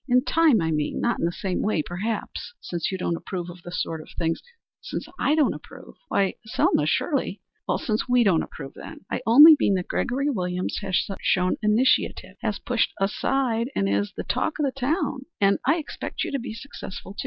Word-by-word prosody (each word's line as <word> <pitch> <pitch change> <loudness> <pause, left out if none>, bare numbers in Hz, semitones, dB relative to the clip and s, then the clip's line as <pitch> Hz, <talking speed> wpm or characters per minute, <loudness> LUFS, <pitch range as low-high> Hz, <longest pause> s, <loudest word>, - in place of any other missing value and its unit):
In 250 +1 +4
time, 315 - +4
I 160 0 0
mean. 150 -1 -1
Not 240 - 0
in - - +1
the 170 - +1
same 190 -1 -2
way, 205 -7 +1
perhaps, 210 - -4
since 175 0 -3
you 190 - -2
don't 175 -2 -1
approve 175 0 -5
of 175 0 -13
the 175 - -9
sort 165 -2 -3
of - - -14
things 165 -1 -1 0.2
" - - -71
"Since - - -5
I 300 - +3
don't 305 -3 +3
approve? - - -12
Why, 195 -1 +1
Selma, 185 -8 +1
surely 260 - 0 0.2
" - - -1
"Since 215 +2 -1
we 245 -1 +5
don't 185 -7 +3
approve, 135 -3 -8
then. - - -11
I - - -1
only 295 +8 +10
mean 200 - +3
that 180 -1 -2
Gregory 275 +4 0
Williams 180 -5 -2
has 190 -2 0 0.2
shown 180 -1 +2
initiative, 210 -4 +2
has 215 -4 -1
pushed 240 +3 0
ahead, 230 +4 0
and 100 - +1
is 100 +1 +1
er - - -26
the - - -3
talk 315 - -1
of 300 - +1
the 270 - 0
town. 270 0 -2
I 200 +9 +3
expect 310 - -5
you - - -3
to 275 - -1
be 235 -2 -6
successful, 225 -6 -8
too. - - -13
210 Hz, 210 wpm, -25 LUFS, 180-255 Hz, 0.2 s, only